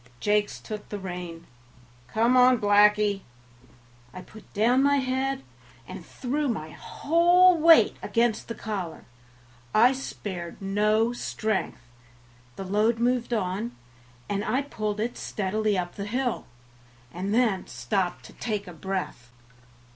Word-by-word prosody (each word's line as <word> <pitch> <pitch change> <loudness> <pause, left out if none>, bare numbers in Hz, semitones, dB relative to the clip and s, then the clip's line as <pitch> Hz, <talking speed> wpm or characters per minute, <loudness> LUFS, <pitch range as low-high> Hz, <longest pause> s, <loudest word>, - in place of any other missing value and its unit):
Jakes 210 0 0
took 210 -1 -8
the 205 - -4
rein. 175 -3 -7 0.6
"Come 230 - +2
on, 250 0 +6
Blackie." 205 -1 +4 0.9
I 185 - -8
put 215 -2 -16
down 240 +5 +3
my 285 +1 +4
head, 265 +1 -1 0.4
and - - -8
threw 285 +3 -3
my 155 -11 -3
whole 345 - +3
weight 330 +1 +6
against 230 -2 0
the 230 - -5
collar; 190 -7 -5 0.7
I 240 +4 +6
spared 190 -9 -6
no 210 +4 +1
strength; 215 - -3 0.7
the - - -6
load 210 +4 +2
moved 245 +1 0
on, 215 +1 -2 0.5
and 205 0 -2
I 270 +2 0
pulled 215 -6 -4
it 235 +3 -2
steadily 210 +1 -1
up 175 -1 -3
the 200 - -6
hill, 245 +3 -2 0.7
and 185 +4 -3
then 220 -5 +1
stopped 150 +10 -2
to - - -13
take 210 -3 -3 0.2
breath. 185 -11 -4
215 Hz, 125 wpm, -26 LUFS, 195-245 Hz, 0.9 s, on